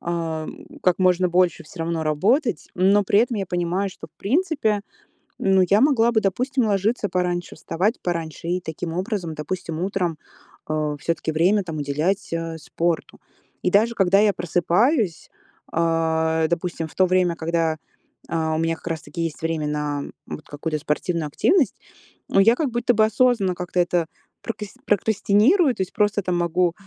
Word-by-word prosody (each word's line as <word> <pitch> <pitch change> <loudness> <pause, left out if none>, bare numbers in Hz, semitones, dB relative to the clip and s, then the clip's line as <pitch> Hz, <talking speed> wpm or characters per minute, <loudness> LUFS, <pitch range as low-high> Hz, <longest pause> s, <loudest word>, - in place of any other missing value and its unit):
ам, 170 - -4 0.2
как 180 -1 +2
можно 185 -1 +3
больше 175 -1 +2
всё 165 +3 -11
равно 165 0 -1
работать, 195 - +1
но 195 +3 +4
при 200 +2 +3
этом 240 0 0
я 195 -2 -2
понимаю, 175 +2 -1
что - - -11
в - - -35
принципе, 270 - +1 0.6
ну, 190 -1 +4
я 205 +3 +5
могла 240 -5 +4
бы, 220 -2 +2
допустим, 250 +6 0
ложиться 205 +2 0
пораньше, 175 -1 -2
вставать 200 +8 -1
пораньше, 165 -2 -4
и 180 +1 0
таким 160 0 -5
образом, 185 -3 -3
допустим, 165 +1 -4
утром, 180 -4 -1 0.5
э, 155 -1 -1
всё-таки 165 0 -2
время 185 +6 +3
там 165 -3 -6
уделять, 155 +8 -1
э, 165 -1 -3
спорту. 165 +1 -2 0.4
И - - +2
даже 220 +4 +4
когда 195 -1 +4
я 210 -1 +4
просыпаюсь, 180 - +1 0.4
а, 160 -1 +1
допустим, 170 -1 -2
в - - -17
то 185 - +4
время, 180 -1 +2
когда, 165 -1 0 0.5
а, 160 -1 0
у - - -1
меня 165 0 0
как 165 - -13
раз 160 -2 -2
таки 170 - -6
есть 165 -2 -4
время 160 -2 -1
на 150 -1 -2 0.2
вот 155 - -8
какую-то 155 +1 -3
спортивную 155 +2 -1
активность, 320 - +2 0.5
я 205 +4 +5
как 285 -2 -1
будто 240 +1 +1
бы 215 - +4
осознанно 220 -3 +2
как-то 180 0 -3
это 175 -1 +1 0.4
прокас 210 -3 -6
прокрастинирую. 220 - +3
То - - -3
есть 185 - -3
просто 205 0 +1
там 180 -1 0
могу 175 0 +1
180 Hz, 165 wpm, -23 LUFS, 165-205 Hz, 0.6 s, я